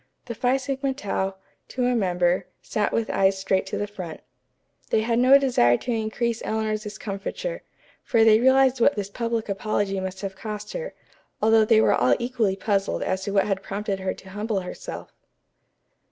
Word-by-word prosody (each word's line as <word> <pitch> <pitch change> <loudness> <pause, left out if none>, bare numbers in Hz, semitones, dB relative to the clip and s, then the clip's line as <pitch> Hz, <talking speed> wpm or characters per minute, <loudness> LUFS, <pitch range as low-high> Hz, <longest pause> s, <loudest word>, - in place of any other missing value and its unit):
The 235 - -5
Phi 250 +4 +1
Sigma 270 0 -2
Tau, 195 -6 -2 0.3
to 250 -1 -2
a 250 - +2
member, 180 -3 +1 0.2
sat 210 -1 -1
with 230 -1 -1
eyes 195 0 +2
straight 190 0 0
to - - -3
the 205 - -1
front. 185 -6 -8 0.7
They 220 - +2
had 230 +1 +1
no 260 +3 +7
desire 235 - +3
to 245 - -4
increase 230 +1 -1
Eleanor's 215 -1 -1
discomfiture, 210 - -5 0.4
for 230 -3 +3
they 220 -1 +6
realized 260 0 +4
what 285 - +4
this 200 -1 -4
public 230 0 -2
apology 200 -1 -1
must 190 0 -5
have 195 -1 -5
cost 210 +1 -6
her, - - -5 0.4
although 220 0 +4
they 220 0 +5
were - - +4
all - - +3
equally 240 -5 0
puzzled 195 -1 -1
as 190 0 -2
to 200 - -2
what 195 -1 +3
had 195 -2 -1
prompted 200 0 -3
her 190 0 -2
to 190 - -14
humble 210 0 -2
herself. 180 - -8
215 Hz, 180 wpm, -24 LUFS, 195-235 Hz, 0.7 s, no